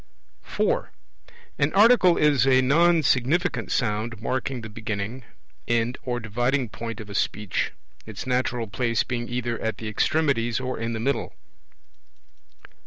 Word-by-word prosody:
(4) - - -1 0.7
An 140 +2 +2
Article 200 -3 +6
is 145 -4 +3
a 130 -1 +5
non 165 +4 +4
significant 150 +7 +1
sound 110 -1 -1
marking 130 +1 -2
the 110 - -7
beginning, 110 +2 -4 0.5
end, 120 +1 0
or 120 -1 -2
dividing 120 +3 -1
point 115 0 -6
of 110 - -8
a 100 - -8
Speech, 105 0 -1 0.4
its 110 -3 -7
natural 125 -2 0
place 115 +3 0
being 120 -1 -4
either 120 -1 -2
at 110 -2 -2
the 110 - -6
extremities 120 0 +1
or 130 0 -4
in 115 +1 -2
the 110 - -3
middle. 135 +5 -2
120 Hz, 140 wpm, -25 LUFS, 115-135 Hz, 0.7 s, Article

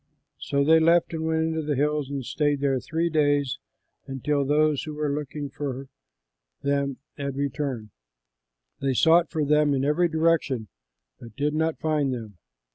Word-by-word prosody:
So 140 0 0
they 160 +3 +6
left 170 +1 +3
and 160 0 -2
went 160 0 +1
into 160 0 -2
the 150 -1 -1
hills 150 0 0
and 140 -3 -4
stayed 145 0 0
there 135 -2 +1
three 165 +6 -1
days 145 -4 +1 0.5
until 140 +2 -1
those 150 +1 +2
who 155 -1 -6
were 150 -1 -1
looking 145 0 -4
for 135 -2 -5 0.7
them 140 -1 0 0.2
had 140 -1 -3
returned. 135 -5 -3 0.9
They 135 -1 0
sought 165 +4 +5
for 155 -3 -1
them 150 0 +3
in 135 0 0
every 160 +5 +3
direction 160 - +1 0.5
but 115 -2 -12
did 150 +1 0
not 160 +1 0
find 150 -3 0
them. 110 -7 -7
145 Hz, 160 wpm, -25 LUFS, 135-155 Hz, 0.9 s, they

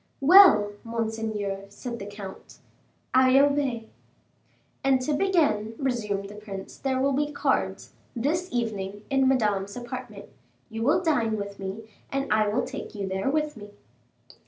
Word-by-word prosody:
"Well, 280 - +7
monseigneur," 220 -3 -3
said 235 +3 -7
the 200 - -7
comte, 200 -2 -10 0.6
"I 260 0 +5
obey." 275 -5 +1 1.0
"And 270 -1 +4
to 295 +4 -1
begin," 290 - +1
resumed 210 -7 -2
the 205 - -10
prince, 205 -2 -8
"there 265 -1 0
will 275 +1 +2
be 295 +2 0
cards, - - -1 0.2
this 320 +10 -1
evening, 205 -4 -3
in 270 -1 +3
Madame's 205 -6 +1
apartment; 240 -1 -7 0.5
you 225 0 -5
will 295 +9 +2
dine 235 -10 +1
with 200 -1 -6
me, 195 +3 -6 0.2
and 275 -4 0
I 215 0 +3
will 215 +4 0
take - - -7
you 200 -2 -3
there 190 +5 -1
with 300 +1 0
me." 205 -2 -11
230 Hz, 145 wpm, -26 LUFS, 205-275 Hz, 1.0 s, Well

